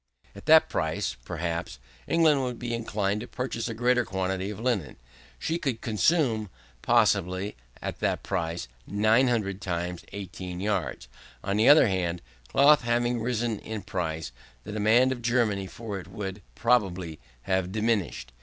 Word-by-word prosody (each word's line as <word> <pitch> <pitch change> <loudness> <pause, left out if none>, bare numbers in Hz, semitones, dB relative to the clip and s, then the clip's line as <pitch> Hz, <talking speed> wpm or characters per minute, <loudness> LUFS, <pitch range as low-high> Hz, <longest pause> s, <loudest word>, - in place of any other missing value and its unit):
At - - -12
that 160 0 +7
price, 80 0 -1
perhaps, 85 +1 -3 0.3
England 155 -4 +4
would 125 -2 -3
be 120 -1 -4
inclined 105 -3 -1
to 120 - -7
purchase 125 -3 -3
a 115 - -4
greater 125 +1 +3
quantity 95 -1 -2
of 105 -1 -6
linen. 110 - -1 0.4
She 165 +1 -2
could 135 -9 -2
consume, 110 - +2 0.3
possibly, 100 -4 +2 0.3
at - - -4
that - - 0
price, 85 -6 -2 0.2
900 110 -1 +2
times 90 -2 -3
18 95 -2 -6
yards. 100 -3 -2 0.4
On 100 0 -1
the 110 +5 +5
other 150 +2 +8
hand, 90 -3 -1 0.2
cloth 145 - +6
having 120 0 +1
risen 115 -2 -1
in 110 -3 -6
price, 80 -5 -3 0.3
the 105 - -7
demand 110 +5 +4
of 125 -2 -3
Germany 115 -5 +1
for 105 -1 -6
it 90 - -11
would, 100 -1 -6
probably, 95 -9 +1 0.2
have 95 +4 0
diminished. 105 - -1
105 Hz, 145 wpm, -27 LUFS, 95-120 Hz, 0.4 s, other